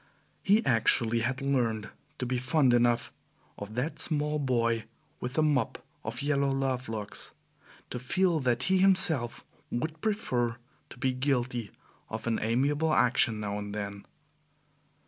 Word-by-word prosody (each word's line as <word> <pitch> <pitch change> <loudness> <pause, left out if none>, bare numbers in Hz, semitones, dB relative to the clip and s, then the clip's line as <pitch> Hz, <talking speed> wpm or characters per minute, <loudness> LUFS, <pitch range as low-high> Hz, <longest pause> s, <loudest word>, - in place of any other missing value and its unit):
He 210 +3 +3
actually 115 -1 +3
had 125 +3 -2
learned 115 -6 0 0.3
to 125 - -3
be 125 0 -1
fond 130 0 +3
enough 120 0 +2 0.5
of 100 +2 -7
that 130 +7 -2
small 150 -1 +1
boy 115 -5 +1 0.3
with 125 0 -4
the 155 - +2
mop 145 -6 0 0.2
of - - -4
yellow 140 -1 +2
love 135 -2 -1
locks, 105 -2 -5 0.6
to 125 - -3
feel 175 +6 +1
that 125 -2 +1
he 190 0 +3
himself 180 -10 +3 0.2
would 155 +6 -3
prefer 125 - 0 0.3
to - - -12
be 130 +1 0
guilty 125 -4 -1 0.4
of 110 0 -5
an 115 -1 0
amiable 140 +8 +1
action 120 -3 +3
now 105 -1 -3
and 105 0 -6
then. 100 -1 -5
125 Hz, 145 wpm, -29 LUFS, 115-145 Hz, 0.6 s, He